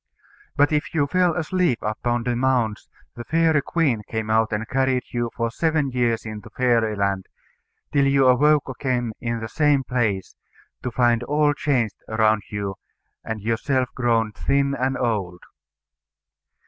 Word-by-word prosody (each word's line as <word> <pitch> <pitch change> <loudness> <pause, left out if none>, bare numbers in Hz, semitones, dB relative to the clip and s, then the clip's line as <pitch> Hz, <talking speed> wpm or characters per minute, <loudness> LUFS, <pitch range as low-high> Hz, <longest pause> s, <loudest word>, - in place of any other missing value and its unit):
But 145 +1 +3
if 150 +2 -1
you 145 -3 +3
fell 180 +2 +2
asleep 175 -5 +1
upon 120 +3 -1
the 125 0 -1
mounds, 120 -4 0 0.2
the 120 - -8
fairy 160 +1 +2
queen 140 -9 0
came 110 -1 -3
out 110 0 +2
and 110 +1 -2
carried 130 -1 +1
you 120 -1 -1
for 115 -1 -1
seven 155 0 0
years 120 -2 0
into 110 -2 -7
Fairyland, 105 -6 0 0.7
till 140 -1 +3
you 135 -1 +3
awoke 145 +4 +4
again 125 -2 -2
in 115 -1 -2
the 110 - -4
same 145 +1 +2
place, 110 -7 -1 0.5
to 125 - -3
find 120 -1 +2
all 150 +3 +2
changed 125 -8 0
around 110 -1 +2
you, 100 -2 -4 0.5
and 110 -2 -5
yourself 125 +3 0
grown 115 -3 +1
thin 140 +5 0
and 130 0 -1
old. 100 -8 -2
120 Hz, 150 wpm, -23 LUFS, 110-140 Hz, 0.7 s, awoke